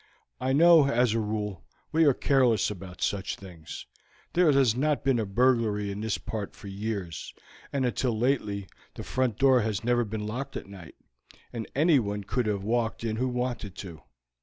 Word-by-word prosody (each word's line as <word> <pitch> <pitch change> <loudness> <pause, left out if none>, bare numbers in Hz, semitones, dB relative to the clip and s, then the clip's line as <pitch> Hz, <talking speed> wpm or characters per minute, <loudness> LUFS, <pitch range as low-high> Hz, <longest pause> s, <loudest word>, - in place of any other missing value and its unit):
I 130 +1 0
know, 160 0 +7
as 120 -3 +2
a 115 - +1
rule, 105 -4 -3 0.3
we 160 +1 +4
are 140 - +6
careless 120 -8 +2
about 95 -2 -7
such 100 -1 -1
things; 90 -5 -10 0.5
there 175 -3 +5
has 135 -5 +4
not 145 +1 0
been 135 -3 +2
a 110 - -1
burglary 110 -2 +2
in 100 +1 -5
this 110 -1 -1
part 105 -3 -5
for - - -11
years, 100 -4 -4 0.4
and 135 -2 0
until 120 -1 0
lately 105 -6 0 0.3
the - - -6
front 125 -4 -1
door 130 -2 +5
has 105 -2 -2
never 120 0 +2
been 105 -1 -4
locked 130 +6 -4
at - - -7
night, 95 -6 -12 0.6
and 115 -2 -4
anyone 130 - +2
could 120 +4 -1
have 100 -2 -1
walked 115 +1 -1
in 110 -1 -2
who 130 +2 0
wanted 125 -5 -3
to. 85 -7 -9
115 Hz, 180 wpm, -28 LUFS, 100-130 Hz, 0.6 s, know